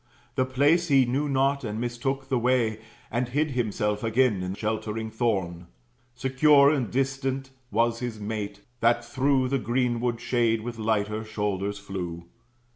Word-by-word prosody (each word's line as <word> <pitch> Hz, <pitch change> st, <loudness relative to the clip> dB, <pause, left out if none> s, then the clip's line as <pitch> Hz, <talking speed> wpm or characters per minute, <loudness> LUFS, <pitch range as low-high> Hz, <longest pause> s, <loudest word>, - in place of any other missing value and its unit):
The 130 Hz, 0 st, +1 dB
place 145 Hz, +7 st, +3 dB
he 135 Hz, -4 st, +5 dB
knew 140 Hz, +5 st, -1 dB
not, 135 Hz, +1 st, +1 dB
and 110 Hz, -1 st, -3 dB
mistook 130 Hz, +3 st, -2 dB
the 130 Hz, -2 st, +1 dB
way, 120 Hz, -3 st, +1 dB, 0.3 s
And 120 Hz, +2 st, -1 dB
hid 150 Hz, +4 st, 0 dB
himself 105 Hz, -3 st, -1 dB
again 115 Hz, -3 st, +2 dB
in 90 Hz, +1 st, -3 dB
sheltering 110 Hz, +1 st, -3 dB
thorn. 95 Hz, -7 st, -1 dB, 0.5 s
Secure 140 Hz, +2 st, +5 dB
and 130 Hz, -8 st, 0 dB
distant 135 Hz, 0 st, -1 dB, 0.2 s
was 115 Hz, +1 st, +1 dB
his 120 Hz, -3 st, -4 dB
mate, 105 Hz, -1 st, -4 dB, 0.2 s
that 120 Hz, +1 st, +2 dB
through 130 Hz, 0 st, +1 dB
The 135 Hz, 0 st, +1 dB
greenwood 120 Hz, 0 st, 0 dB
shade 120 Hz, -2 st, +1 dB
with 115 Hz, 0 st, -6 dB
lighter 110 Hz, 0 st, 0 dB
shoulders 105 Hz, -2 st, -2 dB
flew. 90 Hz, -4 st, -6 dB
120 Hz, 145 wpm, -26 LUFS, 110-130 Hz, 0.5 s, he